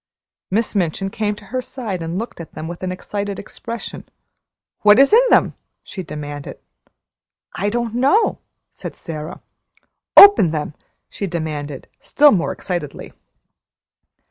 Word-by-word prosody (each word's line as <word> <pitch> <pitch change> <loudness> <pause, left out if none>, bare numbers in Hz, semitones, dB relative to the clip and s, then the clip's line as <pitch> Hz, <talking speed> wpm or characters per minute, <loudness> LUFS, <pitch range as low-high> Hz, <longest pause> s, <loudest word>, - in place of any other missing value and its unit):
Miss 220 +4 0
Minchin 195 0 -1
came 210 -1 -2
to 205 - -15
her 255 - 0
side 225 -9 -5
and 165 +2 -4
looked 225 -4 -5
at 165 - -11
them 160 - -6
with 170 +1 -7
an 185 -1 -3
excited 200 +2 -4
expression. 230 +3 -8 0.7
"What 210 0 +6
is 275 +8 +5
in 465 - +8
them?" - - +4 0.3
she 195 - -7
demanded. 145 -3 -7 1.0
"I 200 +2 -1
don't 235 0 -2
know," 275 - +2 0.3
said - - -8
Sara. 160 0 -7 0.8
"Open 400 - +10
them!" 155 -1 -3 0.4
she 200 - -4
demanded, 150 -5 -5
still 295 0 +4
more 175 -5 +1
excitedly. 175 -6 -5
195 Hz, 135 wpm, -20 LUFS, 165-230 Hz, 1.0 s, Open